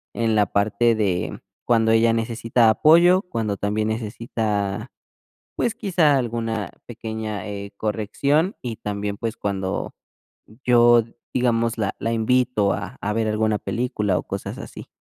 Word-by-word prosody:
en 115 Hz, -1 st, +1 dB
la 105 Hz, -2 st, +3 dB
parte 110 Hz, +4 st, +2 dB
de 95 Hz, -5 st, -1 dB, 0.3 s
cuando 115 Hz, -2 st, +3 dB
ella 115 Hz, 0 st, +4 dB
necesita 115 Hz, 0 st, +2 dB
apoyo, 170 Hz, -, +5 dB
cuando 110 Hz, -, -3 dB
también 105 Hz, +2 st, -1 dB
necesita, 110 Hz, -2 st, -2 dB, 0.7 s
pues 230 Hz, -2 st, 0 dB
quizá 175 Hz, -, +2 dB
alguna 115 Hz, -3 st, -2 dB, 0.2 s
pequeña, 110 Hz, -3 st, -5 dB
eh, 100 Hz, -1 st, -6 dB
corrección, 140 Hz, -, 0 dB
y 120 Hz, -3 st, -4 dB
también, 100 Hz, 0 st, -3 dB
pues 115 Hz, +1 st, -4 dB
cuando 95 Hz, -2 st, -3 dB, 0.7 s
yo, 120 Hz, -1 st, +6 dB, 0.3 s
digamos, 115 Hz, -2 st, +1 dB
la 100 Hz, -3 st, -1 dB
la 115 Hz, -, -1 dB
invito 115 Hz, -2 st, +2 dB
a -, -, -6 dB
a 105 Hz, -, -1 dB
ver 110 Hz, 0 st, 0 dB
alguna 110 Hz, 0 st, +1 dB
película 105 Hz, -6 st, -1 dB
o -, -, -3 dB
cosas -, -, -5 dB
así. -, -, -9 dB
110 Hz, 135 wpm, -23 LUFS, 105-120 Hz, 0.7 s, yo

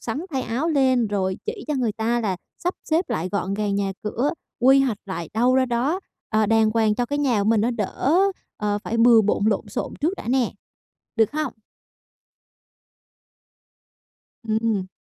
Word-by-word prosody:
sắn 235 Hz, +5 st, -3 dB
thay 265 Hz, -2 st, -1 dB
áo 255 Hz, +9 st, -1 dB
lên 260 Hz, -6 st, +3 dB
rồi 190 Hz, -2 st, -1 dB
chỉ 435 Hz, -2 st, -4 dB
cho 300 Hz, -, 0 dB
người 240 Hz, -5 st, 0 dB
ta 230 Hz, +2 st, 0 dB
là 195 Hz, -5 st, -1 dB, 0.2 s
sắp 355 Hz, +1 st, -2 dB
xếp 325 Hz, +4 st, 0 dB
lại 165 Hz, +4 st, -1 dB
gọn 195 Hz, -1 st, -1 dB
gàng 205 Hz, -1 st, -1 dB
nhà 200 Hz, -1 st, -1 dB
cửa, 235 Hz, +6 st, 0 dB, 0.3 s
quy 270 Hz, +2 st, +6 dB
hoạch 245 Hz, -6 st, 0 dB
lại 170 Hz, -4 st, -5 dB
đâu 245 Hz, +3 st, +3 dB
ra 260 Hz, 0 st, +3 dB
đó, 255 Hz, +9 st, 0 dB, 0.3 s
ờ, 215 Hz, -1 st, +2 dB
đàng 220 Hz, 0 st, +3 dB
hoàng 220 Hz, -2 st, +3 dB
cho 245 Hz, +2 st, -1 dB
cái 285 Hz, +2 st, -2 dB
nhà 245 Hz, -8 st, +2 dB
của 205 Hz, -, 0 dB
mình 225 Hz, -1 st, +4 dB
nó 230 Hz, +3 st, +1 dB
đỡ, 250 Hz, -, +1 dB, 0.4 s
ờ, 205 Hz, -1 st, -1 dB
phải 230 Hz, -, -2 dB
bừa 230 Hz, 0 st, +7 dB
bộn 205 Hz, 0 st, +1 dB
lộn 210 Hz, -3 st, 0 dB
xộn -, -, -4 dB
trước 325 Hz, +6 st, +1 dB
đã -, -, -8 dB
nè, 255 Hz, -1 st, +1 dB, 0.6 s
được 225 Hz, +1 st, +3 dB
hông? 305 Hz, -4 st, -2 dB, 2.9 s
Ừm. 220 Hz, -3 st, 0 dB
230 Hz, 180 wpm, -23 LUFS, 210-265 Hz, 2.9 s, bừa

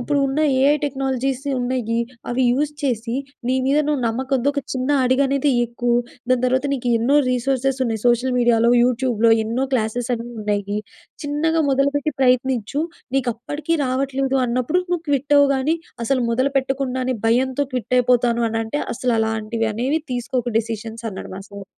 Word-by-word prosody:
ఇప్పుడున్న 275 Hz, +2 st, 0 dB, 0.2 s
AI 280 Hz, +3 st, +4 dB
technologies 270 Hz, -1 st, -2 dB, 0.2 s
ఉన్నాయి. 245 Hz, -2 st, -1 dB, 0.3 s
అవి 255 Hz, +2 st, 0 dB
యూజ్ 290 Hz, +4 st, 0 dB
చేసి, 235 Hz, -3 st, -1 dB, 0.3 s
నీ 260 Hz, -, +2 dB
మీద 280 Hz, +2 st, +3 dB
నువ్వు 295 Hz, -3 st, 0 dB
నమ్మకంతో 260 Hz, +3 st, 0 dB
ఒక 280 Hz, -, -1 dB
చిన్న 255 Hz, 0 st, -2 dB, 0.2 s
అడుగనేది 275 Hz, +2 st, +2 dB
ఎక్కు. 240 Hz, +1 st, -3 dB, 0.4 s
దాని 255 Hz, -1 st, +3 dB
తర్వాత 260 Hz, +2 st, +1 dB
నీకు 245 Hz, -2 st, -3 dB
ఎన్నో 265 Hz, +6 st, +2 dB
రిసోర్సెస్ 265 Hz, +1 st, 0 dB
ఉన్నాయి. 225 Hz, -3 st, -2 dB
సోషల్ 240 Hz, +2 st, +2 dB
మీడియాలో, 235 Hz, -1 st, +4 dB
యూట్యూబ్‍లో 240 Hz, -2 st, +2 dB
ఎన్నో 235 Hz, +4 st, -1 dB
క్లాసెస్ 235 Hz, +2 st, -1 dB
అనేవి 240 Hz, +1 st, -7 dB
ఉన్నాయి. 205 Hz, 0 st, -1 dB, 0.5 s
చిన్నగా 320 Hz, +3 st, +1 dB
మొదలుపెట్టి 280 Hz, +2 st, +1 dB
ప్రయత్నిచ్చు. 255 Hz, +1 st, +1 dB, 0.3 s
నీకు 250 Hz, -3 st, +1 dB
అప్పటికి 290 Hz, +7 st, -3 dB
రావట్లేదు 270 Hz, +1 st, 0 dB
అన్నప్పుడు 255 Hz, +9 st, 0 dB
నువ్వు 350 Hz, -2 st, 0 dB
క్విట్ 285 Hz, 0 st, +1 dB
అవ్వు 285 Hz, -1 st, +5 dB
గానీ, 285 Hz, +5 st, +1 dB, 0.3 s
అసలు 260 Hz, +1 st, +1 dB
మొదలు 255 Hz, +4 st, +1 dB
పెట్టకుండానే 260 Hz, -1 st, -2 dB
భయంతో 260 Hz, +4 st, +2 dB
క్విట్ 250 Hz, -1 st, -2 dB
అయిపోతాను 240 Hz, -1 st, +2 dB
అని 225 Hz, 0 st, -2 dB
అంటే 260 Hz, +7 st, -3 dB
అసలు 245 Hz, 0 st, 0 dB
అలాంటివి 220 Hz, 0 st, -1 dB
అనేవి 265 Hz, +8 st, 0 dB
తీసుకోకు 245 Hz, 0 st, -2 dB
డిసిషన్స్." 225 Hz, 0 st, -5 dB
అన్నాడు, 190 Hz, -, -8 dB
మా 195 Hz, -, -7 dB
సార్. 200 Hz, -1 st, -9 dB
255 Hz, 150 wpm, -21 LUFS, 235-275 Hz, 0.5 s, అవ్వు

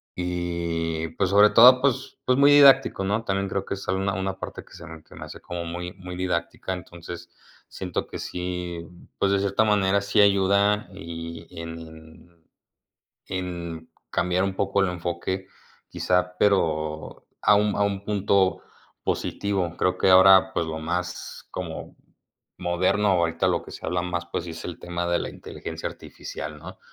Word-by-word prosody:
y 85 Hz, -2 st, -2 dB
pues 90 Hz, +3 st, -1 dB
sobre 105 Hz, +2 st, +6 dB
todo, 125 Hz, +2 st, +8 dB
pues 140 Hz, -3 st, 0 dB
pues 130 Hz, +1 st, +2 dB
muy 140 Hz, +1 st, +7 dB
didáctico, 135 Hz, -7 st, +6 dB
¿no? 105 Hz, +4 st, 0 dB
También 100 Hz, -1 st, -1 dB
creo 100 Hz, 0 st, -2 dB
que -, -, -3 dB
es 100 Hz, -, -10 dB
una 95 Hz, 0 st, -1 dB
parte -, -, -7 dB
que -, -, -19 dB
se -, -, -11 dB
me 80 Hz, -1 st, -10 dB, 0.2 s
hace -, -, -10 dB
como 85 Hz, -1 st, -5 dB
muy 90 Hz, +1 st, -5 dB
muy 90 Hz, -1 st, -9 dB
didáctica, 90 Hz, 0 st, -2 dB
entonces 85 Hz, -1 st, -9 dB, 0.4 s
siento 90 Hz, -2 st, -4 dB
que -, -, -7 dB
sí, 90 Hz, -1 st, -4 dB, 0.4 s
pues 100 Hz, -, +2 dB
de 100 Hz, -, +3 dB
cierta 100 Hz, +2 st, +2 dB
manera 100 Hz, -2 st, +2 dB
sí 100 Hz, +1 st, 0 dB
ayuda 100 Hz, +1 st, +3 dB
y 85 Hz, -3 st, -8 dB
en 80 Hz, 0 st, -11 dB, 0.8 s
en 85 Hz, -3 st, -5 dB, 0.2 s
cambiar 90 Hz, +1 st, +1 dB
un 95 Hz, -1 st, -2 dB
poco 100 Hz, 0 st, +1 dB
el 95 Hz, -, +1 dB
enfoque, 90 Hz, +2 st, -3 dB, 0.4 s
quizá, 90 Hz, 0 st, 0 dB
pero 80 Hz, -6 st, 0 dB, 0.2 s
a 105 Hz, -, +6 dB
un 105 Hz, 0 st, +2 dB
a 105 Hz, -, +1 dB
un 100 Hz, 0 st, -1 dB
punto 100 Hz, -4 st, +2 dB, 0.4 s
positivo. 95 Hz, -4 st, -2 dB
Creo 90 Hz, 0 st, 0 dB
que -, -, +3 dB
ahora, 95 Hz, +1 st, +7 dB
pues 85 Hz, -, +1 dB
lo 80 Hz, 0 st, -4 dB
más 90 Hz, +2 st, -4 dB
como 85 Hz, -3 st, -6 dB, 0.6 s
moderno 95 Hz, +4 st, +1 dB
ahorita 85 Hz, -3 st, +2 dB
lo -, -, 0 dB
que -, -, -11 dB
se -, -, -10 dB
habla 90 Hz, 0 st, 0 dB
más, 90 Hz, -1 st, -3 dB
pues 85 Hz, -, -4 dB
es 85 Hz, 0 st, -8 dB
el 85 Hz, -1 st, -6 dB
tema 85 Hz, 0 st, -4 dB
de 85 Hz, -, +2 dB
la -, -, -3 dB
inteligencia -, -, -7 dB
artificial, 75 Hz, +1 st, -8 dB
¿no? 90 Hz, +4 st, -11 dB
90 Hz, 160 wpm, -25 LUFS, 85-100 Hz, 0.8 s, todo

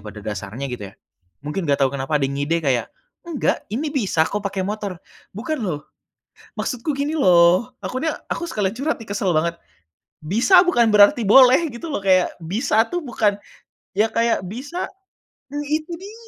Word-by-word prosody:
pada 105 Hz, 0 st, -10 dB
dasarnya 105 Hz, +5 st, -5 dB
gitu 105 Hz, -5 st, -6 dB
ya. -, -, -17 dB, 0.5 s
Mungkin 150 Hz, +3 st, -3 dB
nggak 140 Hz, -1 st, +3 dB
tahu 135 Hz, -, 0 dB
kenapa 140 Hz, +2 st, -1 dB
ada 140 Hz, -, 0 dB
ngide 145 Hz, +4 st, -1 dB
kayak, 125 Hz, -4 st, +1 dB, 0.4 s
"Enggak, 310 Hz, -5 st, 0 dB
ini 280 Hz, +9 st, -3 dB
bisa 195 Hz, -, +1 dB
kok 205 Hz, -, -3 dB
pakai 200 Hz, -2 st, -3 dB
motor", 205 Hz, -2 st, -4 dB, 0.4 s
"bukan 260 Hz, +5 st, -3 dB
loh, 170 Hz, -9 st, -2 dB, 0.8 s
maksudku 255 Hz, +4 st, -2 dB
gini 285 Hz, +3 st, -2 dB
loh," 180 Hz, -, +4 dB
aku 255 Hz, +3 st, -4 dB
nya 320 Hz, -2 st, -1 dB
aku -, -, -3 dB
sekali 210 Hz, -, -2 dB
curhat 290 Hz, +2 st, -2 dB
nih 225 Hz, -, -11 dB
kesel 200 Hz, -2 st, -1 dB
banget. 170 Hz, +1 st, +1 dB, 0.7 s
Bisa 235 Hz, -, +5 dB
bukan 295 Hz, -11 st, +3 dB
berarti 205 Hz, +2 st, +6 dB
boleh 255 Hz, +4 st, +7 dB, 0.2 s
gitu 315 Hz, +7 st, -7 dB
loh -, -, -1 dB
kayak, 185 Hz, -3 st, +2 dB
bisa 215 Hz, -, +1 dB
tuh 350 Hz, -1 st, -3 dB
bukan 220 Hz, -6 st, +1 dB, 0.6 s
ya 210 Hz, +3 st, +2 dB
kayak 230 Hz, -4 st, 0 dB
bisa 270 Hz, -, -5 dB, 0.6 s
nah 290 Hz, +1 st, -4 dB
itu 310 Hz, +3 st, -2 dB
dia, 400 Hz, +4 st, -10 dB
205 Hz, 170 wpm, -21 LUFS, 165-265 Hz, 0.8 s, boleh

